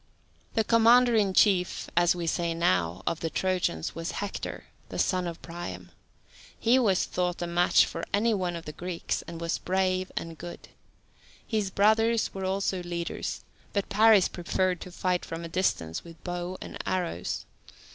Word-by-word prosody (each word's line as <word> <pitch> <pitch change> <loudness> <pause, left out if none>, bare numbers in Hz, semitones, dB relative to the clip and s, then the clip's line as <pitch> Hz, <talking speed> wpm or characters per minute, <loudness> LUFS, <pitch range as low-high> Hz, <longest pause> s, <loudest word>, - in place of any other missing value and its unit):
The 225 - +3
commander 235 +2 +5
in 205 -3 +3
chief, 185 -4 +3
as 175 +1 +4
we 175 -1 -3
say 170 0 0
now, 90 - +1
of 165 - -1
the 165 - -2
Trojans 180 - -1
was 165 +2 -4
Hector, 205 0 -4 0.3
the - - -6
son 185 -2 +1
of 170 -1 -6
Priam. 95 - -7 0.7
He 245 +3 +4
was 200 -7 +3
thought 180 -1 -1
a 175 - -2
match 175 +1 +4
for 165 - -6
any 220 +3 +2
one 180 -4 -1
of 170 - -7
the 150 - -5
Greeks, 175 +2 -3
and 170 -1 -7
was 170 0 -1
brave 185 0 0
and 165 -1 -5
good. 175 0 -9 0.8
His 215 -4 -1
brothers 220 +3 +3
also 190 0 -1
were 180 - -5
leaders, 170 -1 -4 0.3
but 200 -1 -1
Paris 215 -2 +6
preferred 180 0 -1
to 180 - -8
fight 180 0 0
from 165 +1 -6
a - - -4
distance 160 - -1
with 165 -1 -14
bow 175 +1 -4
and - - -8
arrows. 175 - -2
180 Hz, 165 wpm, -28 LUFS, 170-195 Hz, 0.8 s, Paris